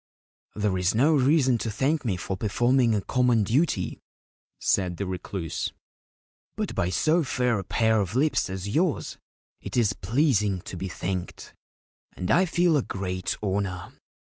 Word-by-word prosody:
'There 100 Hz, -3 st, 0 dB
is 90 Hz, +3 st, +1 dB
no 145 Hz, +8 st, +4 dB
reason 135 Hz, -3 st, +3 dB
to 115 Hz, -, -2 dB
thank 135 Hz, +8 st, 0 dB
me 105 Hz, -7 st, -1 dB
for 95 Hz, +2 st, -4 dB
performing 120 Hz, +4 st, +2 dB
a 100 Hz, -, 0 dB
common 125 Hz, -4 st, +2 dB
duty/ 135 Hz, -, 0 dB, 0.6 s
said 90 Hz, -3 st, +1 dB
the 100 Hz, -, -2 dB
Recluse; 90 Hz, -2 st, -4 dB, 0.4 s
' -, -, -64 dB
but -, -, -2 dB
by 85 Hz, -, 0 dB
so 155 Hz, -, +2 dB
fair 125 Hz, -5 st, 0 dB
a -, -, -4 dB
pair 110 Hz, +2 st, +2 dB
of 100 Hz, +3 st, -4 dB
lips 145 Hz, -6 st, +2 dB
as 95 Hz, +1 st, -5 dB
yours 160 Hz, -, -1 dB, 0.4 s
it -, -, -5 dB
is 110 Hz, -4 st, +3 dB
pleasing 110 Hz, -, +1 dB
to -, -, -8 dB
be 95 Hz, +2 st, -4 dB
thanked, 90 Hz, 0 st, -5 dB, 0.6 s
and 90 Hz, -, -3 dB
I 185 Hz, +3 st, +5 dB
feel 175 Hz, 0 st, +2 dB
the 145 Hz, -, +3 dB
great 95 Hz, -4 st, -3 dB
honour. 95 Hz, -2 st, -2 dB
110 Hz, 160 wpm, -26 LUFS, 95-135 Hz, 0.6 s, I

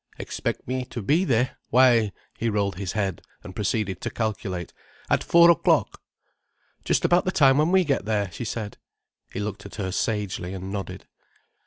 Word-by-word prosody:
"Expect -, -, -4 dB
me 130 Hz, +1 st, -2 dB
to 120 Hz, -3 st, -7 dB
be 155 Hz, -, +3 dB
there? 125 Hz, -2 st, +1 dB
Why—" 120 Hz, -4 st, +5 dB, 0.2 s
he 115 Hz, -, -1 dB
rolled 100 Hz, -4 st, -1 dB
his 95 Hz, -1 st, -4 dB
eyes 95 Hz, -5 st, -1 dB, 0.3 s
and 95 Hz, -, -10 dB
proceeded 100 Hz, -3 st, -1 dB
to -, -, -2 dB
calculate. 100 Hz, -6 st, -4 dB, 0.4 s
"At -, -, +3 dB
four 170 Hz, 0 st, +7 dB
o'clock." 170 Hz, -, +1 dB, 0.8 s
"Just -, -, +1 dB
about 175 Hz, +1 st, +4 dB
the 185 Hz, -, -1 dB
time 135 Hz, -5 st, +5 dB
when 155 Hz, +3 st, +2 dB
we 190 Hz, 0 st, +5 dB
get 140 Hz, -, -1 dB
there," 105 Hz, -3 st, -1 dB
she 120 Hz, -, -6 dB
said. 110 Hz, -2 st, -5 dB, 0.5 s
He -, -, -5 dB
looked 100 Hz, -1 st, -4 dB
at -, -, -12 dB
her 95 Hz, -3 st, -3 dB
sagely, 100 Hz, -3 st, -2 dB
and 95 Hz, +1 st, -6 dB
nodded. 95 Hz, -2 st, -6 dB
105 Hz, 175 wpm, -25 LUFS, 95-130 Hz, 0.8 s, four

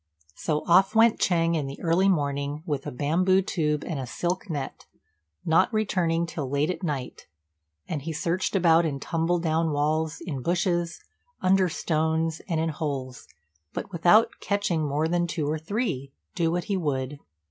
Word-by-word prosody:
So 150 Hz, -, -2 dB
off 190 Hz, +5 st, +4 dB
went 225 Hz, 0 st, +5 dB
Ch'êng 170 Hz, -2 st, +2 dB
in 150 Hz, -4 st, -1 dB
the 135 Hz, -, -7 dB
early 175 Hz, +4 st, +3 dB
morning, 145 Hz, -2 st, -1 dB
with 145 Hz, -5 st, -3 dB
a -, -, -3 dB
bamboo 180 Hz, +8 st, +2 dB
tube 150 Hz, -5 st, -1 dB
and 160 Hz, -5 st, -3 dB
a 130 Hz, -, -4 dB
silk 180 Hz, -, -3 dB
net, 145 Hz, -4 st, -5 dB, 0.6 s
not 160 Hz, +8 st, +3 dB
returning 180 Hz, -6 st, +1 dB
till 155 Hz, -5 st, -5 dB
late 145 Hz, +4 st, +1 dB
at 185 Hz, -, -6 dB
night; 145 Hz, -8 st, -4 dB, 0.6 s
and 150 Hz, -, -3 dB
he 165 Hz, +4 st, -4 dB
searched 170 Hz, +5 st, -1 dB
about 170 Hz, -3 st, +5 dB
in 145 Hz, -4 st, -2 dB
tumble 165 Hz, +4 st, 0 dB
down 165 Hz, -1 st, +1 dB
walls, 155 Hz, +2 st, 0 dB
in 140 Hz, -7 st, -5 dB
bushes, 175 Hz, +1 st, 0 dB, 0.4 s
under 185 Hz, 0 st, +3 dB
stones, 160 Hz, 0 st, 0 dB
and 165 Hz, -2 st, 0 dB
in 160 Hz, 0 st, 0 dB
holes, 140 Hz, -5 st, -4 dB, 0.5 s
but -, -, -5 dB
without 180 Hz, +6 st, +5 dB
catching 200 Hz, -6 st, 0 dB
more 150 Hz, +2 st, 0 dB
than 175 Hz, +1 st, +1 dB
two 165 Hz, -3 st, -2 dB
or 155 Hz, +1 st, -1 dB
three, 160 Hz, -, -2 dB, 0.2 s
do 165 Hz, -1 st, +1 dB
what 175 Hz, +1 st, -1 dB
he 205 Hz, -2 st, -2 dB
would. 140 Hz, -4 st, -2 dB
165 Hz, 170 wpm, -26 LUFS, 150-175 Hz, 0.6 s, went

